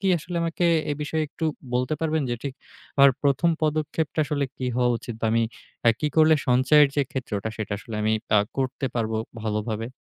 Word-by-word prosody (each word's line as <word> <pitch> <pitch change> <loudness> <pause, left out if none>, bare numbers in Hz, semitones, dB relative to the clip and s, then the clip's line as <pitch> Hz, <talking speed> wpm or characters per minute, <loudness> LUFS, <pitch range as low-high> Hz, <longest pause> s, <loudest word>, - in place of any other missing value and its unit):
কি 195 - +1
আসলে 175 +2 -6
আমাকে 165 +1 -1 0.3
এ - - +1
বিষয়ে 155 +1 -1
একটু 160 - -5 0.3
বলতে 125 +4 +1
পারবেন 160 -1 0
যে - - +1
ঠিক 140 -2 -4 0.4
আমার 140 0 +8
১ম 145 +4 +3
পদক্ষেপটা 155 +1 0
আসলে 145 0 -1
কী 130 - -3
হওয়া 125 -1 +3
উচিত 120 - -7
বা - - +1
আমি 115 0 +3 0.6
কি - - +1
করলে 160 0 +6
সঞ্চয়ের 130 +4 +5
যে 145 - +4
ক্ষেত্রটা 120 -7 -3
সেটা 110 -2 -4
আসলে 115 - -9
আমি 110 - +2 0.2
আ - - +7 0.2
করতে 135 0 -1
পারবো 110 -2 -1 0.3
ভালোভাবে? 110 +1 -2
140 Hz, 185 wpm, -25 LUFS, 115-155 Hz, 0.6 s, আমার